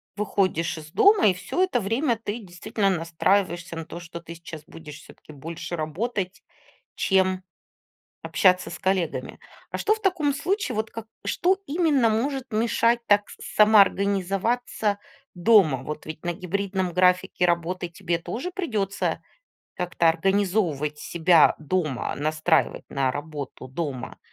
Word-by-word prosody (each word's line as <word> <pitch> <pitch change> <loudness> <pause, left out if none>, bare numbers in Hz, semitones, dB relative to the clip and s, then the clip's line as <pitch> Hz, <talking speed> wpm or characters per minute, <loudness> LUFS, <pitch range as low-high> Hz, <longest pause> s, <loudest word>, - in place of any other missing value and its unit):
выходишь 185 -5 0
из 155 0 -10
дома, 405 - +5
и 190 - +4
всё 265 - -3
это 315 -11 +2
время 230 +4 0
ты 215 +2 -3
действительно 200 +1 -2
настраиваешься 175 0 0
на 165 - -5
то, 170 - -8
что 170 0 -9
ты 170 0 -9
сейчас 160 -2 -10
будешь 160 -1 -11
всё-таки 155 - -15
больше 165 +4 -6
работать, 180 +4 -3 0.5
чем 190 -1 +2 0.8
общаться 185 -1 +2
с - - -8
коллегами. 185 -3 -1 0.3
А - - -2
что 430 - +2
в 440 - -7
таком 350 -8 +1
случае, 370 - -1
вот 220 0 -2
как 225 -1 -8 0.2
что 375 +2 +2
именно 290 -6 +2
может 260 +4 -1
мешать 230 +2 +2
так 205 0 +3
с - - -10 0.2
самоорганизоваться 200 +1 +3 0.4
дома? 175 - +4
Вот 150 +2 -6
ведь 155 0 -8
на 175 - -1
гибридном 190 0 -2
графике 180 0 +3
работы 175 +1 -1
тебе 170 0 -2
тоже 225 - -5
придётся 220 - -2 0.5
как-то 175 -2 +1
организовывать 175 -4 +1
себя 170 0 +4
дома, 155 -4 -2
настраивать 155 +2 +1
на 135 -2 +1
работу 145 -3 -6
дома. 135 -2 -5
185 Hz, 135 wpm, -25 LUFS, 165-220 Hz, 0.8 s, дома